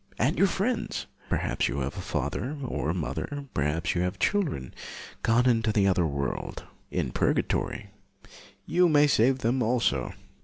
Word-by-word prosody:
And 130 +7 +2
your 195 - +4
friends, 225 +6 -1 0.2
perhaps - - 0
you 70 - -2
have 65 +1 -3
a - - -5
father 140 +5 -2
or 75 - -2
a - - +1
mother, 140 - -3
perhaps 75 +3 0
you 85 - 0
have 90 0 -1
children, 165 - 0 0.5
gone 120 +3 +3
into 115 -2 +3
the 105 -2 +3
other 90 -3 +3
world, 70 -2 -3 0.3
in - - -1
purgatory, - - 0 0.7
you 180 0 +3
may 150 -1 +6
save 130 -2 +4
them 125 +1 0
also. 120 +1 +1
115 Hz, 155 wpm, -27 LUFS, -, 0.7 s, may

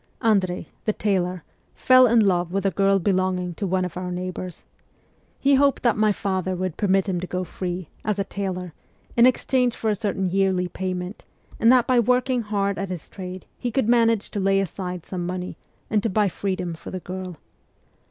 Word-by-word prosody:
Andrei, 190 -6 +2 0.2
the 215 - +1
tailor, 185 -5 -1 0.3
fell 255 0 +6
in 230 0 +5
love 180 -4 +2
with 195 +1 -1
a 195 - +3
girl 195 +2 +3
belonging 185 -1 0
to 200 +4 -3
one 185 0 +1
of 180 - -6
our 180 0 -4
neighbours. 180 0 -5 0.7
He 280 +1 +3
hoped 280 0 +3
that 235 -3 +3
my 215 0 +3
father 190 -2 -1
would 185 -2 -3
permit 195 -1 +2
him 180 -2 -1
to 180 - -5
go 185 +1 -2
free, 180 -1 -5 0.2
as 210 -2 -1
a 200 - +1
tailor, 185 -3 -4 0.4
in 235 +1 +7
exchange 250 -1 +1
for 220 - 0
a - - +1
certain 200 -2 -2
yearly 185 0 +1
payment, 185 +1 -4 0.4
and 230 - +6
that 255 -2 +5
by 255 -1 +3
working 250 +1 +2
hard 200 -2 -1
at 195 -1 -3
his 180 -4 -6
trade 185 -1 -8
he 245 - -2
could 235 -1 0
manage 230 -3 +3
to 205 - -3
lay 195 0 +3
aside 180 -2 -4
some 180 -2 -4
money 180 +1 -4 0.3
and 215 -1 +1
to 225 - 0
buy 210 +1 +2
freedom 185 -2 -3
for 160 - -9
the 185 - -4
girl. 185 -1 -6
190 Hz, 195 wpm, -24 LUFS, 180-215 Hz, 0.7 s, in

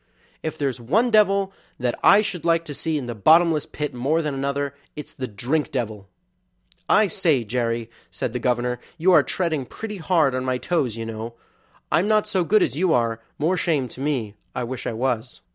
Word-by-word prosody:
If 160 - -4
there's 135 -4 -2
one 220 - +2
devil 200 -2 +3 0.3
that 125 -1 0
I 205 +2 +7
should 200 -5 -4
like 165 0 +2
to 150 - -6
see 160 +2 -2
in 140 - -4
the 120 - -4
bottomless 160 - +4
pit 150 -1 -4
more 145 +7 0
than 150 -2 -2
another, 140 +1 -2 0.2
it's 150 - -8
the 130 -2 -5
drink 125 +9 -1
devil." 110 -6 -4 0.8
"I 215 - +5
say, 165 - +1
Jerry," 115 0 -1 0.2
said 115 - -4
the 125 - -2
governor, 125 0 0 0.2
"you 175 +3 +3
are 175 - +7
treading 160 -6 -1
pretty 215 -2 -6
hard 160 -5 +2
on 130 0 -1
my 130 -1 0
toes, 130 -7 -1
you 115 - -4
know; 115 +1 -6 0.6
I'm 180 +5 +3
not 215 -1 +3
so 195 -4 0
good 210 +5 +4
as - - -1
you 180 +2 +2
are, 115 -2 +1 0.2
more 170 +5 +1
shame 150 -8 0
to 130 - -10
me; 130 -8 -1 0.2
I 125 - -1
wish 125 +1 -5
I - - -2
was." 125 0 -2
140 Hz, 200 wpm, -23 LUFS, 120-170 Hz, 0.8 s, I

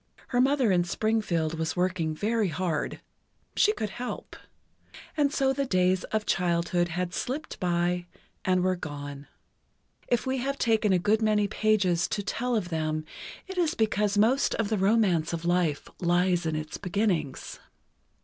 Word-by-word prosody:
Her 245 -1 +2
mother 265 -4 +3
in 175 -1 +3
Springfield 175 -5 0
was 160 0 -1
working 180 -3 0
very 215 +4 +1
hard—she 175 - -2
could 215 - -4
help. 250 +1 -6 0.8
And 290 -2 +2
so 270 -2 +2
the 275 0 -1
days 185 -2 +2
of 215 -1 -2
childhood 175 0 +1
had 175 +1 -3
slipped 290 +10 -4
by, 175 0 0 0.4
and 185 -1 +2
were 185 0 +2
gone. 145 -3 -7 0.8
If 245 - +1
we 260 0 0
have 275 +2 -2
taken 220 -4 +2
a 185 - +5
good 210 +5 +2
many 210 -1 +2
pages 195 -5 +2
to 205 - -2
tell 245 +4 -1
of 190 -5 -1
them, 155 -1 -2 0.4
it 380 -2 -5
is 335 -3 +1
because 210 -2 +1
most 240 +7 +3
of 225 -3 -1
the 220 - +1
romance 190 -6 +2
of 170 0 -4
life 175 -4 +1
lies 175 -1 +2
in 160 - -1
its 155 0 -5
beginnings. 180 -7 -1
Mrs. - - -27
185 Hz, 160 wpm, -27 LUFS, 170-220 Hz, 0.8 s, a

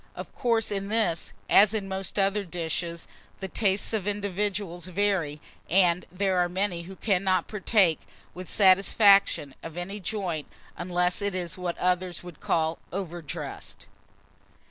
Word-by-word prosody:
Of - - -8
course 230 -4 0
in 195 -1 -2
this, 200 - 0 0.2
as 210 +2 +6
in 200 -3 -2
most 190 0 -4
other 200 +1 +2
dishes, 170 -1 -4 0.3
the 190 - -5
tastes 200 +2 0
of 210 -3 -1
individuals 200 -3 -2
vary; 185 -6 0 0.3
and 180 -1 +3
there 190 0 0
are 175 0 +2
many 185 -1 -1
who 190 - -9
cannot 190 -3 +1
partake, 195 -5 +2 0.3
with 180 0 -8
satisfaction, 195 -5 +5
of 165 +1 -9
any 195 +4 -5
joint 185 -6 -3 0.3
unless 180 +1 0
it 200 -2 -1
is 175 -3 -3
what 180 -2 -4
others 180 -1 -1
would 175 -3 -11
call 160 0 0
overdressed. 175 -5 -6
185 Hz, 140 wpm, -27 LUFS, 175-200 Hz, 0.3 s, as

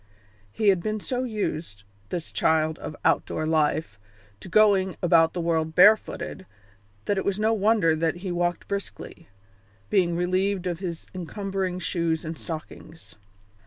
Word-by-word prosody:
He 215 - +2
had 190 -3 +3
been 215 +3 -2
so 250 +4 -2
used, 165 - -4 0.3
this 170 -2 -4
child 160 0 +1
of 150 - -7
outdoor 155 - +1
life, 155 -9 0 0.4
to - - -11
going 195 -2 +4
about 165 -2 +4
the 175 - -2
world 160 -1 0
barefooted, 200 -1 +3 0.6
that 200 - +1
it - - -2
was 200 0 -1
no 220 +1 +2
wonder 205 -6 +3
that 160 +1 0
he 185 - -2
walked 175 0 -1
briskly, 200 -4 -6 0.6
being 175 -3 +2
relieved 185 +2 0
of 175 -2 -2
his 175 -4 -5
encumbering 190 0 -3
shoes 170 -2 -1
and 160 +1 -4
stockings. 160 0 -9
175 Hz, 145 wpm, -25 LUFS, 160-195 Hz, 0.6 s, going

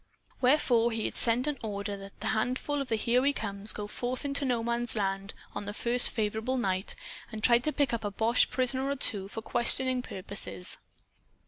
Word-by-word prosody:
Wherefore 245 -3 +3
he 225 -1 -2
had - - -3
sent 235 +2 +2
an 295 -3 -2
order 205 -2 -4
that 195 0 -10
a - - -1
handful 255 +6 -1
of 275 - -5
the 225 - +2
"Here 235 +3 +2
We 280 +2 +2
Comes" 200 -3 -1
go 210 - -4
forth 245 +6 -4
into 280 0 +2
No 245 -3 0
Man's 235 +1 -1
Land, 195 -1 -2 0.2
on 205 - -5
the 205 - -5
first 240 +2 +4
favorable 220 +3 -1
night, 190 -4 -1 0.4
and 215 -1 -7
try 235 -1 +6
to 305 +5 -1
pick 285 -5 0
up 230 - -2
a 205 - -1
boche 225 +4 +2
prisoner 260 +1 +1
or 280 - 0
two 200 -7 +1
for 225 +2 -7
questioning 255 +2 +3
purposes. 180 - -2
235 Hz, 200 wpm, -29 LUFS, 205-255 Hz, 0.4 s, try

